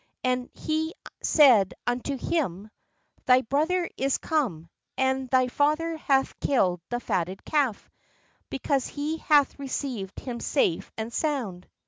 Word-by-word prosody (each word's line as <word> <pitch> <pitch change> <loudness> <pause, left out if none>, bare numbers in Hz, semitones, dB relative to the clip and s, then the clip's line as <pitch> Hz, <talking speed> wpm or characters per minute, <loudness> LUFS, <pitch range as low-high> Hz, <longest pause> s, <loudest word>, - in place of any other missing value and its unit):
And 250 -1 0
he 315 +1 -2 0.3
said 245 - +5
unto 250 +3 -1
him: 220 - -2 0.6
'Thy 255 0 +6
brother 315 +8 0
is 270 0 +1
come; 230 - -1 0.3
and 265 0 0
thy 255 0 +3
father 305 +5 +1
hath 270 -3 +1
killed 185 -10 +1
the 240 - -1
fatted 185 -4 -2
calf, 275 -8 0 0.6
because 275 0 -1
he 300 +2 -3
hath 290 -3 +3
received 255 -8 -4
him 245 -3 -5
safe 205 - 0
and 225 +1 -4
sound." 240 - -2
265 Hz, 125 wpm, -26 LUFS, 230-295 Hz, 0.6 s, Thy